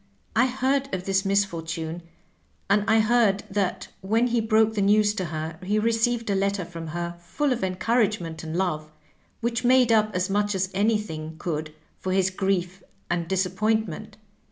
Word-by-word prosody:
" -, -, -36 dB
I 240 Hz, +3 st, +5 dB
heard 265 Hz, +2 st, 0 dB
of 180 Hz, -, -5 dB
this 195 Hz, 0 st, +1 dB
misfortune, 165 Hz, -4 st, -1 dB, 0.7 s
and 205 Hz, 0 st, +4 dB
I 220 Hz, 0 st, +5 dB
heard 215 Hz, -3 st, +3 dB
that 195 Hz, -2 st, -1 dB
when 220 Hz, +5 st, +2 dB
he 240 Hz, -1 st, +1 dB
broke 220 Hz, 0 st, +3 dB
the 210 Hz, -, -1 dB
news 205 Hz, +1 st, +4 dB
to 190 Hz, -4 st, -3 dB
her, 160 Hz, 0 st, -5 dB
he 200 Hz, +3 st, 0 dB
received 230 Hz, +1 st, +1 dB
a -, -, +1 dB
letter 195 Hz, -1 st, 0 dB
from 165 Hz, -1 st, -8 dB
her 170 Hz, +2 st, -4 dB
full 280 Hz, +10 st, 0 dB
of 240 Hz, -, -4 dB
en 185 Hz, -1 st, -1 dB
couragement 200 Hz, -7 st, 0 dB
and 160 Hz, +1 st, -4 dB
love, 155 Hz, -5 st, -1 dB, 0.5 s
which 235 Hz, 0 st, -1 dB
made 250 Hz, -1 st, +5 dB
up 215 Hz, -1 st, +4 dB
as 185 Hz, 0 st, +1 dB
much 205 Hz, +1 st, 0 dB
as 190 Hz, 0 st, -1 dB
any 210 Hz, +3 st, +3 dB
thing 160 Hz, -6 st, -6 dB
could 155 Hz, -2 st, -4 dB, 0.2 s
for 185 Hz, -, -2 dB
his 190 Hz, 0 st, +2 dB
grief 190 Hz, -1 st, -1 dB, 0.3 s
and 170 Hz, -1 st, -1 dB
disappointment. 195 Hz, +2 st, -1 dB
195 Hz, 180 wpm, -25 LUFS, 175-220 Hz, 0.7 s, I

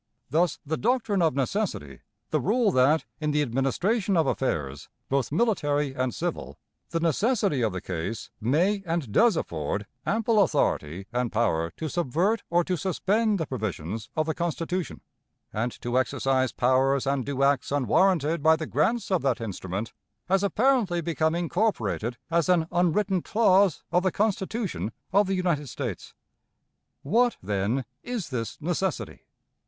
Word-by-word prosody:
Thus 165 Hz, +1 st, +2 dB
the 155 Hz, +2 st, -2 dB
doctrine 225 Hz, -4 st, +1 dB
of 160 Hz, -5 st, +2 dB
necessity 135 Hz, -, -2 dB, 0.3 s
the -, -, +1 dB
rule 220 Hz, +1 st, +2 dB
that, 145 Hz, +3 st, +3 dB
in 155 Hz, -1 st, -1 dB
the 150 Hz, 0 st, +2 dB
administration 175 Hz, -, 0 dB
of 160 Hz, -, +3 dB
affairs, 75 Hz, -, -2 dB, 0.2 s
both 135 Hz, -2 st, 0 dB
military 145 Hz, -, +1 dB
and 130 Hz, -1 st, 0 dB
civil, -, -, -4 dB, 0.3 s
the 165 Hz, -, -1 dB
necessity 190 Hz, -, +1 dB
of 110 Hz, -3 st, +1 dB
the 95 Hz, -1 st, -5 dB
case 95 Hz, +5 st, -5 dB
may 175 Hz, -, +2 dB
and 165 Hz, -9 st, -2 dB
does 225 Hz, -, +4 dB
afford 80 Hz, -, -3 dB, 0.2 s
ample 220 Hz, 0 st, +2 dB
authority 85 Hz, -, 0 dB
and 125 Hz, -1 st, 0 dB
power 95 Hz, -8 st, +1 dB
to 160 Hz, -, -3 dB
subvert 175 Hz, -, 0 dB
or 175 Hz, +1 st, +3 dB
to 180 Hz, +1 st, -1 dB
suspend 205 Hz, +4 st, +1 dB
the 160 Hz, -, -2 dB
provisions 110 Hz, -, -4 dB
of 155 Hz, -, +2 dB
the 160 Hz, -, -1 dB
Constitution, 170 Hz, +1 st, -3 dB, 0.5 s
and 115 Hz, +3 st, -1 dB
to 120 Hz, +1 st, +1 dB
exercise 130 Hz, -1 st, +1 dB
powers 130 Hz, +3 st, +2 dB
and 135 Hz, -1 st, 0 dB
do 140 Hz, +1 st, -1 dB
acts 140 Hz, -1 st, +2 dB
unwarranted 155 Hz, -, +2 dB
by 160 Hz, +2 st, +5 dB
the 160 Hz, 0 st, -4 dB
grants 190 Hz, -, 0 dB
of 185 Hz, -, +2 dB
that 135 Hz, -3 st, +1 dB
instrument 100 Hz, -1 st, -5 dB, 0.3 s
has 190 Hz, +1 st, +2 dB
apparently 205 Hz, -4 st, +2 dB
become 160 Hz, 0 st, 0 dB
incorporated 170 Hz, -, -1 dB
as 170 Hz, 0 st, +2 dB
an 175 Hz, -3 st, +4 dB
unwritten 180 Hz, +2 st, +1 dB
clause 195 Hz, -4 st, +3 dB
of 180 Hz, -, +3 dB
the 185 Hz, 0 st, +1 dB
Constitution 200 Hz, -, -1 dB, 0.2 s
of 200 Hz, 0 st, +4 dB
the 195 Hz, -, 0 dB
United 170 Hz, -7 st, 0 dB
States. 120 Hz, -, -5 dB, 0.9 s
What, 235 Hz, -, +2 dB
then, 105 Hz, +6 st, -1 dB, 0.2 s
is 240 Hz, -7 st, -4 dB
this 115 Hz, -5 st, -4 dB
necessity? 175 Hz, +1 st, -3 dB
160 Hz, 150 wpm, -26 LUFS, 125-190 Hz, 0.9 s, by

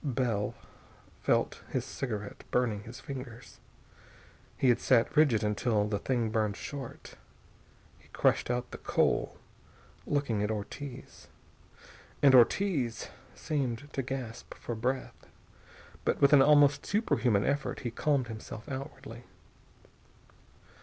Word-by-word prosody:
Bell 120 Hz, -7 st, -1 dB, 0.7 s
felt -, -, +1 dB
his -, -, -2 dB
cigarette 105 Hz, -6 st, -5 dB
burning 115 Hz, -5 st, 0 dB
his 125 Hz, +3 st, -9 dB
fingers. 130 Hz, -3 st, -9 dB, 1.0 s
He 130 Hz, -, +3 dB
had 120 Hz, -, +4 dB
sat 120 Hz, +1 st, +3 dB
rigid 135 Hz, -8 st, +4 dB
until 105 Hz, 0 st, +1 dB
the 105 Hz, -1 st, -1 dB
thing 120 Hz, -2 st, 0 dB
burned 110 Hz, -2 st, 0 dB
short. 140 Hz, -4 st, -8 dB, 0.9 s
He -, -, -22 dB
crushed -, -, +1 dB
out 125 Hz, 0 st, -2 dB
the -, -, -8 dB
coal, -, -, +1 dB, 0.7 s
looking 140 Hz, -8 st, 0 dB
at 105 Hz, -, 0 dB
Ortiz. 120 Hz, +6 st, -7 dB, 1.0 s
And 140 Hz, -2 st, +7 dB
Ortiz 130 Hz, -, +3 dB, 0.3 s
seemed 145 Hz, -3 st, -3 dB
to 135 Hz, -, -1 dB
gasp 125 Hz, -3 st, -6 dB
for 120 Hz, -, -5 dB
breath. 125 Hz, +4 st, -3 dB, 0.8 s
But -, -, 0 dB
with 140 Hz, +1 st, +5 dB
an 140 Hz, -, +8 dB
almost 145 Hz, 0 st, +5 dB
superhuman 125 Hz, -, +1 dB
effort 140 Hz, 0 st, -1 dB
he 120 Hz, -, -3 dB
calmed 135 Hz, 0 st, +1 dB
himself 110 Hz, 0 st, -8 dB
outwardly. 135 Hz, -3 st, -7 dB
125 Hz, 120 wpm, -30 LUFS, 110-140 Hz, 1.0 s, an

